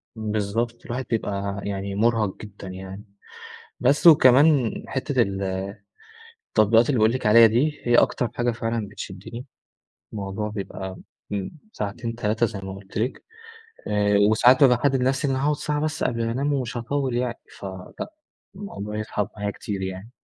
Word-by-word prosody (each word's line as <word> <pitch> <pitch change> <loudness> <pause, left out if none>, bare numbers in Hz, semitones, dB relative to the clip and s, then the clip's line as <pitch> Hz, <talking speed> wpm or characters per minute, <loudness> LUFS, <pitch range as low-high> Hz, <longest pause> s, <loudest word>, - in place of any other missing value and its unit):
بالضبط 110 +2 -2
الواحد 125 +2 -4
بيبقى 100 -3 -2
يعني 100 0 -3
مرهق 110 -2 +1
جدًا 100 -2 -10
يعني، 95 +2 -8 0.8
بس 140 +7 +4
وكمان 140 -4 +6 0.2
حتة - - 0
ال 95 0 -1 1.1
التطبيقات 115 +3 +4
اللي 135 - +2
باقول 110 +1 +4
لِك 130 - -3
عليها 115 +2 +8
دي، 140 +7 0
هي 120 0 +3
أكتر 120 0 +3
حاجة 120 0 0
فعلًا 115 -2 -2
بتشدني، 105 +4 -8 0.7
الموضوع 100 0 -4
بيبقى 95 -2 -6 0.4
امم، 100 -2 -2 0.2
ساعتين، 115 +3 -4
3 115 0 +1
زي 105 -3 -6
ما 95 0 -6
قُلت 95 0 -8
لِك، 120 +5 -2 0.6
آآ 105 -1 +2
وساعات 125 +4 +5
بابقى 125 -4 +7
محدد 135 +1 +1
لنفسي 135 +3 +1
إن - - +1
أنا 130 - -1
هاقعد 150 +1 +2
ساعة 150 0 -2
بس 155 +1 -2
قبل 115 -1 0
ما 115 - -1
أنام 140 +4 0
ومش 125 -3 -2
هاطول 130 +1 -1
يعني، 120 -1 -2 0.2
فلأ، 95 - -7 0.4
الموضوع 105 - -6
يسحب 105 -1 -2
معايا 105 0 -2
كتير 100 -3 -5
يعني. 95 +3 -5
115 Hz, 155 wpm, -24 LUFS, 100-125 Hz, 1.1 s, عليها